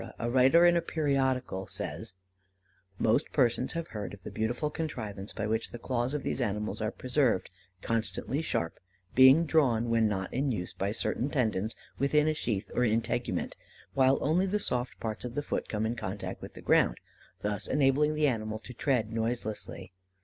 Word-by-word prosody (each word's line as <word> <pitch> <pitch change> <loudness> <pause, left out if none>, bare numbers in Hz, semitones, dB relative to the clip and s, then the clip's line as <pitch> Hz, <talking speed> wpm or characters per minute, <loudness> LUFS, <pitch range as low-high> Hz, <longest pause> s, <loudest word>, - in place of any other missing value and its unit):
a 120 +1 -2
writer 135 +7 +6
in 175 0 +6
a 170 - +3
periodical 130 - 0
says: 100 +1 -5 0.8
"Most 115 +8 +2
persons 125 -2 +2
have 165 -1 -4
heard 105 -3 -5
of 95 - -22
the - - -7
beautiful 120 +7 -1
contrivance 110 -11 -4
by 110 - -3
which 110 +1 -1
the 120 - -7
claws 125 +2 -1
of 150 - -3
these - - -2
animals 105 -1 -2
are 110 - 0
preserved 125 -5 0 0.3
constantly 115 +5 -1
sharp; 85 - -2 0.3
being 130 +6 +7
drawn, 125 -8 +2
when 115 -1 +4
not 95 -3 -2
used, 125 -9 -2
by 100 +1 0
certain 120 +4 -1
tendons, 110 -6 0 0.2
within 150 +2 +3
a 155 - +3
sheath 110 -9 -2
or 125 - +2
integument, 115 -1 0 0.4
while 135 0 +4
only 175 +6 +2
the 205 +2 +1
soft 125 -10 -2
parts 110 -2 -4
of 125 -1 -6
the 145 - -1
foot - - -3
come 110 0 -1
in 115 +2 -1
contact 100 -3 -5
with - - -9
the - - -10
ground, - - +3 0.4
thus 105 0 -2
enabling 145 +2 +3
the 150 0 +2
animal 110 -5 0
to 120 +3 -11
tread 115 -4 0
noiselessly. 110 -5 -3
120 Hz, 175 wpm, -30 LUFS, 110-140 Hz, 0.8 s, being